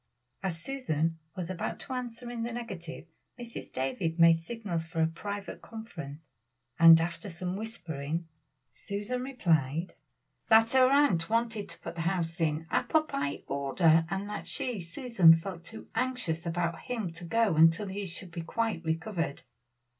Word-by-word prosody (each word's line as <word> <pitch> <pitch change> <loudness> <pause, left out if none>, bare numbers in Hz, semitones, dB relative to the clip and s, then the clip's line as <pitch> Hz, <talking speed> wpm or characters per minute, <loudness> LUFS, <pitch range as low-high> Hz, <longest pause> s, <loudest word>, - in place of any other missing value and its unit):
As 180 -4 -2
Susan 165 - -1 0.2
was 180 -1 -4
about 180 - -3
to 265 - -6
answer 245 -1 -5
in 235 -1 -4
the 235 +1 -2
negative, 190 -10 -6 0.3
Mrs. 235 -1 -7
Davies 160 +6 -2
made 165 0 +8
signals 185 -3 -4
for 165 0 -6
a 160 - +5
private 200 +5 -5
conference; 160 - -9 0.5
and 165 0 +10
after 170 +5 -3
some 180 +1 -4
whispering, 165 -7 -4 0.5
Susan 210 +5 -4
replied, 170 - 0 0.6
"that 225 +1 +6
her 260 -1 +6
aunt 275 - +3
wanted 230 -3 0
to 165 - -11
put - - -6
the 170 - -4
house 170 0 -1
in 155 0 0
apple 315 -1 +3
pie 140 - -3
order, 155 +4 +3
and 195 +2 -2
that 210 - -5
she, 240 -7 -1
Susan, 170 -1 +5
felt 170 +1 -6
too 220 +6 -10
anxious 225 -10 -1
about 170 0 -1
him 220 -9 -4
to 165 +2 -9
go 220 +1 +2
until 165 +5 +5
he 195 0 -4
should 175 +1 -6
be 170 0 -5
quite 215 +1 -2
recovered." 165 -1 -2
175 Hz, 155 wpm, -30 LUFS, 165-225 Hz, 0.6 s, and